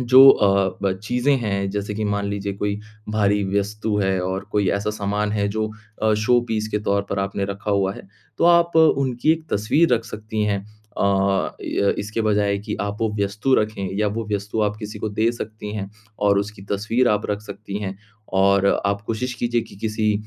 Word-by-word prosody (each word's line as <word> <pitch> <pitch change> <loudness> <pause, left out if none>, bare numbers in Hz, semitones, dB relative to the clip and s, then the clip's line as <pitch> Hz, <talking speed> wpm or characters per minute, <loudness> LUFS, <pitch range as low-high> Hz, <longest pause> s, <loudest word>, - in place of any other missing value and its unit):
जो 130 +2 +8
अ, 95 -4 +2
ब 100 - +2
चीज़ें 125 +4 +2
हैं 100 -4 -1
जैसे 105 +1 -3
कि 110 +1 -2
मान 100 -1 -1
लीजिए 100 0 -3
कोई 100 +1 -2 0.3
भारी 105 -1 +2 0.2
वस्तु 105 +1 -2
है 95 -2 +1
और 95 +1 -2
कोई 100 -2 +2
ऐसा 100 +1 -1
सामान 105 0 -1
है 100 -1 +1
जो 110 +1 -1 0.3
अ, 110 0 +4
शो 120 +3 +3
पीस 110 -1 -1
के 105 - +1
तौर 100 0 +2
पर 100 - -1
आपने 100 0 -1
रखा 100 +2 -4
हुआ 95 -1 +2
है - - -11 0.3
तो - - +2
आप 170 -1 +5
उनकी 140 -3 +4
एक 160 -1 -4
तस्वीर 125 +10 +3
रख 115 -1 -2
सकती 110 -1 -4
हैं। 100 -1 +1 0.4
अ, - - +2 0.6
य 100 - +1
इसके 110 +3 -3
बजाय 105 -2 +2
कि 105 +1 -5
आप 100 0 -3
वो 110 - +2
वस्तु 105 +7 +1
रखें 105 -4 0
या 105 -1 +2
वो 110 +2 -4
वस्तु 105 +2 -2
आप 105 0 0
किसी 105 -1 -7
को 110 - -2
दे 110 +3 +1
सकती 110 -2 -7
हैं 100 -1 -4 0.3
और 100 -1 +3
उसकी 100 -1 -4
तस्वीर 115 +5 +1
आप 105 0 +1
रख 105 0 -1
सकती 100 -1 -6
हैं। 95 -1 -4 0.4
और 100 0 +4 0.2
आप 100 0 0
कोशिश 125 +3 -2
कीजिए 120 0 0
कि - - -14
किसी 110 0 0
105 Hz, 200 wpm, -22 LUFS, 100-110 Hz, 0.6 s, जो